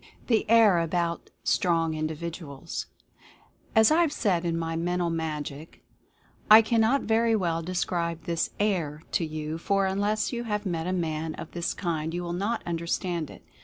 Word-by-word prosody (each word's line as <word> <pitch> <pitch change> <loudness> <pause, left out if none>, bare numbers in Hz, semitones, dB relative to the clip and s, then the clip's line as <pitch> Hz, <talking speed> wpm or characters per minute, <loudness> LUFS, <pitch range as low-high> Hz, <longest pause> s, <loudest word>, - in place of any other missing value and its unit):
THE 225 -3 +1
"AIR 220 -6 +6
ABOUT" 170 0 -1
STRONG 165 -3 +2
INDIVIDUALS. 155 -1 -5 0.9
As 220 +3 +6
I 325 +2 +5
have 330 -4 +2
said 180 - 0
in 165 -1 0
my 165 0 -2
"Mental 175 +1 0
Magic:" 155 -2 -5 0.7
"I 220 +1 +10
cannot 230 +4 +2
very 225 +1 +2
well 170 -5 0
describe 170 -1 -2
this 170 -1 -1
'air' 165 -7 0
to - - +1
you, 155 0 -4
for 195 +2 +1
unless 205 +4 0
you 240 0 -3
have 210 -1 -2
met 170 -2 -2
a - - 0
man 160 -3 -2
of - - -8
this 170 0 -2
kind 165 -2 -2
you 175 - -3
will 170 0 -3
not 205 +6 -1
understand 170 -1 -2
it. - - -13
170 Hz, 165 wpm, -27 LUFS, 165-205 Hz, 0.9 s, I